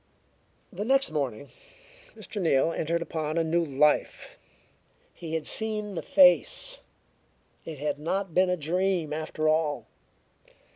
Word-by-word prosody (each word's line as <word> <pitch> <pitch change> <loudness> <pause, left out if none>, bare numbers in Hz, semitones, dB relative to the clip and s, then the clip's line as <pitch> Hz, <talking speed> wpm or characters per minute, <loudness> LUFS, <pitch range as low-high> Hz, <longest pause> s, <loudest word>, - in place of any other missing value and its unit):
The 195 +3 -4
next 270 0 +2
morning 140 -4 -3 0.7
Mr. 205 - -7
Neal 160 -2 +2
entered 170 +1 -1
upon 155 -1 -4
a 165 - +2
new 170 +1 +1
life. 150 0 0 0.8
He 165 -1 -6
had 160 - -3
seen 215 -2 -1
the 170 - -4
face; 285 - +4 0.9
it 160 -2 -7
had 145 0 -3
not 185 +3 -3
been 185 +2 +3
a 180 - 0
dream 175 0 -1
after 155 0 -3
all. 155 -1 0
165 Hz, 130 wpm, -27 LUFS, 150-190 Hz, 0.9 s, face